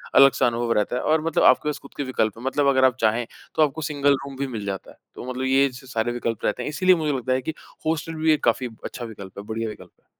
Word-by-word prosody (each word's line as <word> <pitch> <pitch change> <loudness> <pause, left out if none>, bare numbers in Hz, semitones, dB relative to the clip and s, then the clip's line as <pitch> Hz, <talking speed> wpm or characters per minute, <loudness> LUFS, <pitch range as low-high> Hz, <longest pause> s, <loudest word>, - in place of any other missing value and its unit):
अलग-सा 135 -2 +6
अनुभव 120 0 -1
रहता 105 +2 0
है। - - -1
और 155 0 +2
मतलब 165 - +2
आपके - - +5
पास 150 - -3
ख़ुद 140 - -14
के 145 - -1
विकल्प 115 -5 -1
हैं 115 - -10
मतलब 140 +2 +1
अगर 130 -1 +5
आप 130 -2 +3
चाहें, 115 +2 +2 0.3
तो - - +2
आपको 150 +1 -1
सिंगल 145 -2 +2
रूम 140 -1 -8
भी 140 - -2
मिल 110 -5 -5
जाता 95 -1 -5
है। - - -19 0.2
तो 125 - -7
मतलब 130 +1 -3
ये 135 +1 +4
छ 130 +2 -12
सारे 115 +1 0
विकल्प 115 -2 -3
रहते - - 0
हैं। - - -3
इसीलिए 185 +5 +4
मुझे 155 -3 -1
लगता 130 0 -1
है 130 - 0
कि 160 - -4 0.3
हॉस्टल 160 +1 -1
भी 160 0 +2
एक 150 - -2
काफ़ी 120 +2 +2 0.2
अच्छा 120 - -5
विकल्प 100 -4 -9
है, - - -7
बढ़िया 110 +1 -3
विकल्प 105 - -11
है। - - -43
130 Hz, 275 wpm, -24 LUFS, 115-145 Hz, 0.3 s, अलग-सा